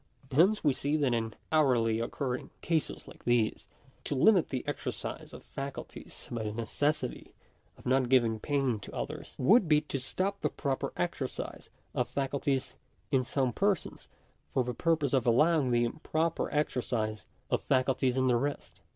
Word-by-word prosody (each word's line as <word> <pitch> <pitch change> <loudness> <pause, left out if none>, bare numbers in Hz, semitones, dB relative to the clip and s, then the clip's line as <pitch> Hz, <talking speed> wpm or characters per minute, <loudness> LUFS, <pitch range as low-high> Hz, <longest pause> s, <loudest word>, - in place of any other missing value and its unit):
Hence 185 +10 +4
we 145 -3 +4
see 145 +4 0
that 140 -5 +2
in 115 -1 -1 0.2
hourly 120 -8 +3
occurring 125 +2 -3
cases 165 -3 -1
like - - -13
these, 120 -3 +1 0.4
to 145 - -1
limit 185 +6 +5
the 130 0 -4
exercise 145 - -4
of - - -11
faculties 140 0 -7
by 120 -2 -2
the 105 -1 -2
necessity 125 +5 -2 0.4
of - - -17
not 130 -1 +2
giving 120 -4 +3
pain 135 -4 0
to 100 - -10
others, - - -5
would 190 - +5
be 150 -1 +6
to 145 -2 -4
stop 195 +9 -1
the - - +1
proper 135 -3 -2
exercise - - -3 0.2
of 120 -1 0
faculties 135 0 -1 0.3
in 130 -1 +3
some 130 -1 0
persons, 200 -3 -1 0.4
for 130 - +2
the 125 0 -3
purpose 155 -1 +1
of 130 -3 +2
allowing 150 +3 +4
the 120 -1 +3
improper 155 +6 -1
exer 150 -4 0
cise 110 -4 -2 0.2
of - - +2
faculties 130 -1 +1
in 130 - +3
the 125 -2 +4
rest. 140 +4 -4
135 Hz, 160 wpm, -30 LUFS, 120-150 Hz, 0.4 s, be